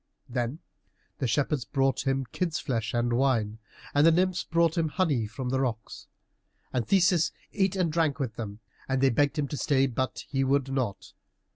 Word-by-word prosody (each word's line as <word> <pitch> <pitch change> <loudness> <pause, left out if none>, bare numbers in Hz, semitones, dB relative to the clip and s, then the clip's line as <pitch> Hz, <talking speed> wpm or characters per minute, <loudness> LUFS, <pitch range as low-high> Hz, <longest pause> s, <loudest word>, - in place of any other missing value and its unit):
Then 125 +2 -2 0.6
the 130 - 0
shepherds 140 +2 0
brought 135 +2 0
him 135 0 +1
kids' 175 -4 -1
flesh 115 -5 -2
and 120 0 0
wine, 115 -4 +1 0.3
and 145 - +4
the 165 - +7
nymphs 185 +2 +1
brought 165 -1 +2
him 165 -2 +1
honey 150 - 0
from 125 +4 -5
the 130 +1 0
rocks. 115 -5 -3 0.7
And 120 -3 -1
Theseus 180 -4 +3 0.2
ate 195 -2 +1
and 180 -4 +1
drank 160 -4 +1
with 130 -6 -2
them, 110 -1 -7 0.3
and 130 0 +1
they 135 0 +4
begged 145 +5 +2
him 145 -2 0
to 145 - -4
stay, 135 -1 +2
but 130 0 -2
he 135 -1 0
would 135 0 +1
not. 120 -8 -3
135 Hz, 180 wpm, -28 LUFS, 120-155 Hz, 0.7 s, the